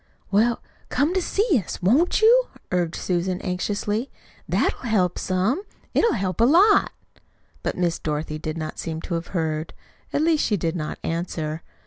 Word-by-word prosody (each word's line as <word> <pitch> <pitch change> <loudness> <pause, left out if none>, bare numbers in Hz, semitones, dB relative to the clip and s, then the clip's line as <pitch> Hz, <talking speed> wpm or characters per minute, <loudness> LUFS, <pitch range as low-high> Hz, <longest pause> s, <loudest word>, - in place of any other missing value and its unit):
"Well, 225 +4 +2 0.3
come 285 +7 +1
to 375 - +1
see 375 - +2
us, - - -6
won't 275 - +3
you?" - - +6 0.2
urged 175 -2 0
Susan 180 0 -1
anxiously. 205 +5 -2 0.4
"That'll - - +1
help 185 -5 +2
some 190 - 0 0.3
it'll 465 - +3
help 185 -2 -1
a - - +7
lot." 385 - +5 0.7
But - - -3
Miss 175 -2 0
Dorothy 155 0 -3
did 155 0 -4
not 155 -1 -5
seem 160 -1 -4
to 175 - -5
have 170 0 -2
heard. 160 -1 -2 0.4
At 295 - +1
least 320 -2 +3
she 210 - +1
did 165 -1 -1
not 155 -3 -4
answer. 165 -2 -3
185 Hz, 160 wpm, -24 LUFS, 165-265 Hz, 0.7 s, a